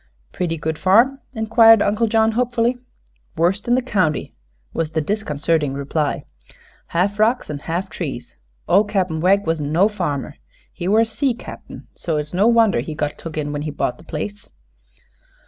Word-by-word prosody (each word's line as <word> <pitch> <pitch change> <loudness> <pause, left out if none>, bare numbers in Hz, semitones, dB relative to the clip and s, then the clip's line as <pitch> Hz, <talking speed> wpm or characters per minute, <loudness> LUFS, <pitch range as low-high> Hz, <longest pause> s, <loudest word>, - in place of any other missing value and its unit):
"Pretty 170 -2 -2
good 160 0 -3
farm?" 235 +9 +4 0.2
inquired 225 0 +6
Uncle 215 +3 +1
John, 220 0 +3
hopefully. 245 +1 +1 0.6
"Worst 185 +6 +1
in 240 - +4
the 255 - 0
county," 185 - 0 0.4
was 160 -1 -2
the 160 - +1
disconcerting 155 -5 -1
reply. 145 +1 -2 0.6
"Half 200 +5 0
rocks 225 -3 +2
an' 145 - -5
half 170 +6 -3
trees. 135 -10 -6 0.3
Ol' 195 +4 +5
Cap'n 185 -6 -1
Wegg 195 +3 +3
wasn't 155 -3 -1
no 180 +6 +4
farmer. 155 -9 -3 0.4
He 175 -1 -5
were 215 +3 +4
a - - +3
sea 235 +3 -1
cap'n; - - -10
so 165 -3 -2
it's 150 +2 -4
no 195 +5 +3
wonder 230 - +4
he 150 +6 -5
got 150 -1 -3
took 160 -2 -7
in 145 -1 -2
when 145 0 -3
he 150 - -3
bought 140 -3 -2
the - - -14
place." 205 +7 -6
185 Hz, 170 wpm, -20 LUFS, 155-220 Hz, 0.6 s, inquired